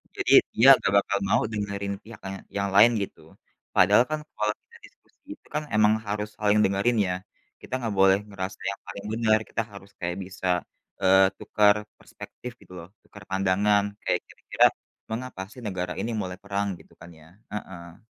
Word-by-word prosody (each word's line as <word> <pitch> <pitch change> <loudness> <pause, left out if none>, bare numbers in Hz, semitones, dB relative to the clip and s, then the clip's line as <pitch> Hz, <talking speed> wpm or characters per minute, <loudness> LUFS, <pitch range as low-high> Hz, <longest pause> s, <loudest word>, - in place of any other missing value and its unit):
jadi - - +1 0.2
dia 120 +4 +4
nggak 100 - -1
bakal 100 0 +1
mau - - +3
dengerin 100 -1 -3
pihak 110 -1 -12
ka 95 - -5 0.3
yang 100 0 0
lain 115 +4 +8
gitu. 100 - -6 0.5
Padahal 120 - +6
kan 155 - -1 0.2
kalau 105 0 +1
kita - - -19
diskusi - - -25
itu - - -22
kan 150 - 0
emang 105 0 +5
harus 105 +1 -3
saling 105 0 +2
dengerin 100 +5 +1
ya, 90 - -1 0.5
kita - - -11
nggak 110 -3 -2
boleh 95 0 +6
ngerasa 95 -1 -6
yang 100 - -5
paling 100 - -8
bener, 110 -1 +3
kita - - -1
harus 100 0 -12
kayak 85 +1 -3
bisa, 95 0 -9 0.6
eee, 95 0 +6
tukar 105 -1 +3 0.2
perspektif 125 - -10
gitu 90 -2 -15
loh, 85 0 -10
tukar 105 -2 -15
pandangan, 100 +2 +2 0.2
kayak - - +1
kira-kira - - +1 0.4
mengapa 115 -3 -5
sih 125 - -12
negara 90 -3 -3
ini 120 - -2
mulai 90 -1 -5
perang 100 0 -2
gitu - - -20
kan 85 - -11
ya? - - -17 0.3
Heeh. 90 -5 -8
100 Hz, 175 wpm, -26 LUFS, 95-105 Hz, 0.6 s, lain